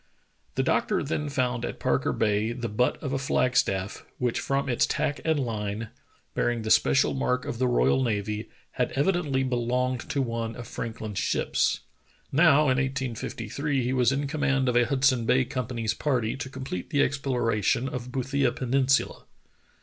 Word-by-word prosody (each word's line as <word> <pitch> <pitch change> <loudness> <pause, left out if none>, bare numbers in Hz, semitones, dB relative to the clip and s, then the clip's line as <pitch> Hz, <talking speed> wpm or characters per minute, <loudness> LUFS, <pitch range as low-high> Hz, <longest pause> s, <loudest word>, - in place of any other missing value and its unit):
The - - +1
doctor - - +1
then 150 +1 -2
found 125 -3 -1
at - - -4
Parker - - +1
Bay 105 +2 +1
the 120 -1 -4
butt 120 +4 +1
of 135 -2 -2
a 135 - 0
flag 130 -1 +1
staff, 95 -5 0
which 125 -2 0
from 140 0 -1
its 120 -2 +2
tack 145 - -1
and 160 -2 +1
line, 110 -3 -3 0.4
bearing 120 -2 0
the 110 - -2
spe - - +5
cial 135 - +3
mark 125 -1 0
of 120 - -4
the 130 - +2
royal 125 +2 +3
navy, 105 -2 -2 0.2
had - - -1
evidently 145 -3 +1
belonged 125 0 0
to 140 - -1
one 115 -3 -2
of 120 - -8
Franklin's 110 -3 -5
ships. - - +1 0.5
Now, 150 0 +5
in 130 -4 +2
1853, 130 +1 -2
he 125 +2 0
was 125 -2 +3
in 140 +1 -1
com 150 +2 -4
mand 135 -2 +2
of 125 - +1
a 120 0 +5
Hudson 130 -4 +2
Bay 130 +2 +4
Company's 120 -3 -2
party 120 -4 0
to 135 0 -6
complete 130 -9 -6
the 145 0 +3
exploration 125 -3 0
of 125 -3 -5
Boothia 135 0 0
Peninsula. 135 +1 +1
125 Hz, 170 wpm, -27 LUFS, 115-135 Hz, 0.5 s, spe